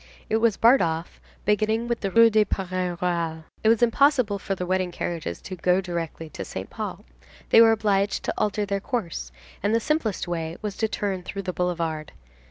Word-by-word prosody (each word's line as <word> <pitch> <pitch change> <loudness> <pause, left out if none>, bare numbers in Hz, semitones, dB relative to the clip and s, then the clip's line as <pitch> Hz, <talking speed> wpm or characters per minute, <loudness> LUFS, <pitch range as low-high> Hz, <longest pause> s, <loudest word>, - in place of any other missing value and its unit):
It 220 - +4
was 225 -2 +2
barred 245 +4 +6
off, 165 +1 -2 0.2
beginning 215 +3 +1
with 235 -1 -1
the 195 - -2
Rue 230 +3 +6
du 215 0 +5
Parc 195 -2 -4 0.3
Royal. 165 -2 -1 0.2
It 220 - +5
was 230 +1 +4
impossible 240 -4 +3
for 195 - -3
the 180 - -4
wedding 185 0 0
carriages 165 - -4
to 185 - -6
go 180 +1 +2
directly 170 -3 -4
to - - -6
Saint - - -7
Paul. - - -5 0.5
They 225 - +8
were 225 -1 +7
obliged 205 -2 +1
to - - -1
alter 210 0 0
their 200 0 -1
course, 185 - -4 0.3
and 205 +3 +2
the - - +3
simplest 230 - -1
way 165 -1 -3
was 210 -2 -4
to 220 - +1
turn 200 -3 -2
through 195 +2 -6
the 180 -1 -3
boulevard. 165 -4 -2
195 Hz, 195 wpm, -25 LUFS, 175-220 Hz, 0.5 s, They